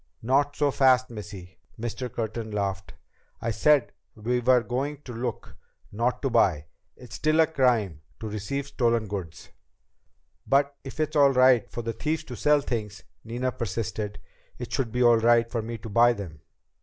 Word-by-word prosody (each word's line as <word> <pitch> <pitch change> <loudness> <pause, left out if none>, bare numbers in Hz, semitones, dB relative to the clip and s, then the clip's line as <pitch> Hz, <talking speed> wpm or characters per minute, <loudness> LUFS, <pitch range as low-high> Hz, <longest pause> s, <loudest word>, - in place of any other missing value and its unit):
"Not 140 +4 +2
so 145 -1 +1
fast, 130 -2 +3
Missy!" 100 -4 -9 0.2
Mr. 120 +2 -4
Curtin 110 0 -4
laughed. 100 -2 -3 0.4
"I 115 - -2
said 140 +4 +3 0.2
we 120 +3 -1
were 125 0 +4
going 140 +4 -3
to 125 - -8
look, 120 0 -5 0.4
not 120 +6 -1
to 135 - +1
buy. 80 -9 +2 0.3
It's 125 -3 -13
still 155 +6 +1
a 160 - +7
crime 120 - +1 0.2
to 110 - -5
receive 110 +7 -4
stolen 120 -5 0
goods." 95 -6 -7 1.0
"But 140 +1 +2
if 135 +2 -9
it's 155 0 -1
all 140 -2 +6
right 130 -2 +4
for 120 - -5
the 115 0 -3
thieves 155 +7 -2
to 125 -5 -8
sell 150 +3 +3
things," 105 -7 -4 0.2
Nina 120 +3 -2
persisted, 110 -3 -4 0.4
"it - - -7
should 125 -4 -1
be 125 +1 +1
all 120 -1 +6
right 115 0 +4
for 115 - -1
me 115 +1 -5
to 110 - -10
buy 120 +3 +5
them." 85 -9 -9
120 Hz, 170 wpm, -26 LUFS, 110-135 Hz, 1.0 s, a